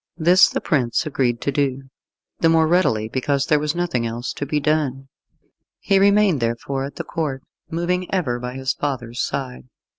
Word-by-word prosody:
This 175 +3 +6
the - - -3
prince 130 -1 0
agreed 125 -5 0
to 140 - -1
do 135 -1 -1 0.6
the 165 - +4
more 160 0 +4
readily 155 -11 +2
because 135 +3 -1
there 150 -3 +3
was 150 +1 -2
nothing 170 -9 -1
else 120 +2 -4
to 145 - -5
be 150 - 0
done. 140 -3 -1 0.7
He 195 -1 +2
remained 200 -5 +4
therefore 120 +4 -2
at 140 - -8
the - - -4
Court, 145 -6 -3 0.3
moving 175 +2 -2
ever 140 -11 0
by 125 +1 -6
his 130 0 -1
father's 125 -4 -3
side. 130 -2 -4
140 Hz, 175 wpm, -21 LUFS, 125-165 Hz, 0.7 s, This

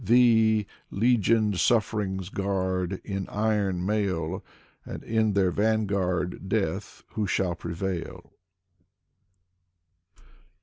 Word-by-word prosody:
Thee, 110 -1 +4 0.3
^egioned 110 -2 +2
sufferings 95 -3 +1
guard, 95 -2 -1
in 95 -2 -4
iron 100 -4 0
mail. 95 -5 -1 0.4
And - - -7
in 110 -2 +1
their 95 -2 +3
vanguard 100 -4 0
Death, 100 -1 -2
who 105 -2 -2
shall 95 -2 0
prevail. 85 +1 -5
100 Hz, 85 wpm, -27 LUFS, 95-110 Hz, 0.4 s, Thee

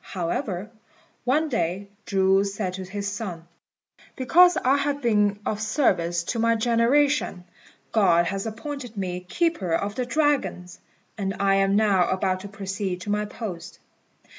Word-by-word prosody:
However, 190 +3 -3 0.5
one 300 +6 +2
day 195 - -2 0.2
Chu 195 -1 +3
said 195 -2 -3
to 190 0 -6
his 200 +2 -4
son, 190 -5 -5 0.7
"Because 355 +7 +5
I 265 +3 +3
have 285 0 -1
been 210 -5 +2
of 210 0 -2
service 175 - +1
to 230 - -3
my 230 0 +3
generation, 235 -1 +2 0.5
God 180 -6 +4
has 195 +4 -3
appointed 245 +1 -7
me 180 -2 -3
Keeper 185 - -1
of 200 +3 -2
the 245 +2 -3
Dragons; 275 - 0 0.4
and 195 -1 -2
I 195 -1 +3
am 195 0 +3
now 200 -4 +3
about 185 0 0
to 200 - -8
proceed 195 -2 -4
to 205 - -4
my 210 0 0
post." 185 -5 -7
205 Hz, 145 wpm, -25 LUFS, 185-235 Hz, 0.7 s, Because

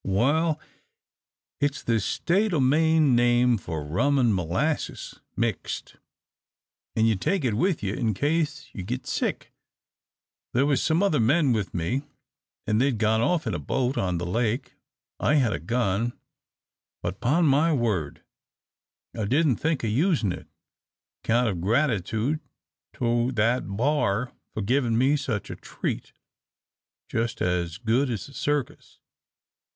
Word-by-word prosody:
"Wal 145 - +1 1.0
it's 145 -1 -1
the 115 -1 +1
State 190 - 0
o' - - +2
Maine 155 +1 +4
name 120 -1 +3
for 80 -6 -5
rum 125 - +1
an' 120 -5 +3
molasses 95 - -2 0.2
mixed, 115 -4 -3 1.0
an' 110 - +3
you 110 -1 +3
take 155 - 0
it 120 - +1
with 165 - 0
you 100 0 -1
in 110 -3 -1
case 150 - -1
you 95 - -6
git 125 +8 -4
sick. - - -2 1.0
There 130 +3 +3
was 145 -2 +2
some 165 +5 +2
other 180 -7 +2
men 135 +4 +3
with 105 -5 -2
me, 100 +11 -1 0.6
an' 105 0 +1
they'd 130 -2 +2
gone 110 +1 +2
off 170 +4 +1
in - - -1
a - - -2
boat 130 0 -1
on 90 -6 0
the 85 - -3
lake. 115 +7 -1 0.5
I 150 - +2
had 125 -7 +3
a - - -3
gun, 115 -1 0 0.9
but 90 +3 -3
'pon 160 +8 +2
my 150 +3 +4
word 105 - -1 0.9
I 110 -3 -2
didn't 135 +1 +2
think 160 -4 -1
o' - - 0
usin' 130 - +1
it, - - -7 0.8
'count 120 +2 +2
of 90 -6 -2
gratitude 115 - +1 0.5
to 120 +1 0
that 115 +3 +1
b'ar 125 -3 +1 0.2
for 110 - -2
givin' 120 +1 +1
me 135 +4 +3
such 125 -8 -3
a - - -5
treat - - -5 1.0
just 115 +1 -2
as 90 -1 -1
good 120 +4 +1
as 115 -5 -4
a 140 - -14
circus. 145 -2 -3
120 Hz, 145 wpm, -26 LUFS, 110-145 Hz, 1.0 s, Maine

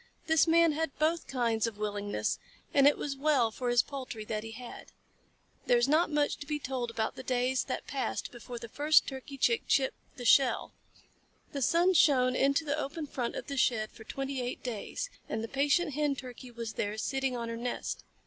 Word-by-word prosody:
This 320 -2 +4
Man 335 0 +5
had 320 0 -2
both 320 +2 +1
kinds 235 -4 +1
of 220 -2 -6
willingness, 205 -1 -2 0.3
and 280 0 +6
it 290 - +4
was 280 -2 -3
well 270 -5 +2
for 245 +2 -3
his 240 0 +4
poultry 255 -6 -6
that 215 0 -3
he 225 0 -7
had. 245 +1 -10 0.8
There 245 - +5
is 240 +2 +3
not 310 +4 +3
much 295 -1 +1
to 290 - -9
be 300 0 -1
told 255 -4 -3
about 225 -1 -2
the - - -7
days 255 0 0
that 255 - -4
passed 265 -4 -3
before 240 0 -8
the 235 0 -7
first 295 +6 +4
Turkey 270 +1 -7
Chick 455 - +2
chipped 265 -1 0
the 245 - -6
shell. 260 +1 +4 0.8
The 280 - -4
sun 345 +8 +4
shone 255 -6 +4
into 280 +5 +2
the 295 +1 -1
open 300 +2 -4
front 245 -4 -3
of - - -5
the 280 - -5
shed 220 -4 +2
for 220 - -13
twenty 270 +2 -4
eight 245 0 -4
days, 255 - -4 0.2
and 220 0 -2
the - - -3
patient 290 +5 +1
Hen 295 0 +1
Turkey 250 -1 -9
was 230 -2 -6
there, 205 +1 -2
sitting 265 +2 -1
on 235 -1 -3
her 230 - -4
nest. 240 +1 -4
260 Hz, 205 wpm, -31 LUFS, 235-290 Hz, 0.8 s, and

